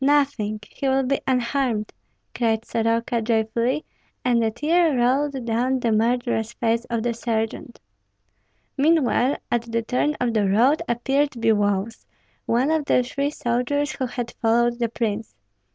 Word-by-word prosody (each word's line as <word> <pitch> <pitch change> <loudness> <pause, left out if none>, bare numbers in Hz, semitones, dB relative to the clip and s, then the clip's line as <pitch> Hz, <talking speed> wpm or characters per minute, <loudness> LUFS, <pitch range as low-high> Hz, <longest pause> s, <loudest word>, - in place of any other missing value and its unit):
nothing! 270 -7 +1
he 275 - -4
will 265 0 +2
be 270 +2 0
unharmed," 250 -3 0 0.4
cried 225 -1 0
Soroka, 230 +1 0
joyfully; 230 +5 0 0.4
and 240 -2 +3
a 225 - +2
tear 305 +5 +2
rolled 265 +1 +1
down 245 +3 0
the 235 -2 0
murderous 230 0 0
face 230 0 0
of 230 -2 -2
the 240 -1 0
sergeant. 225 +1 -3 1.0
Meanwhile 285 -3 +2
at 235 -1 -1
the 230 0 0
turn 255 +6 0
of 245 -2 0
the 205 -3 +2
road 245 +10 +3
appeared 270 +5 +1
Biloüs, 215 -2 0 0.4
one 250 +6 +2
of 315 -2 +1
the 250 - +3
three 280 +3 -2
soldiers 285 +3 -1
who 260 - -3
had 240 -1 -5
followed 235 +1 +2
the 235 -1 0
prince. 220 - -3
240 Hz, 145 wpm, -23 LUFS, 225-270 Hz, 1.0 s, and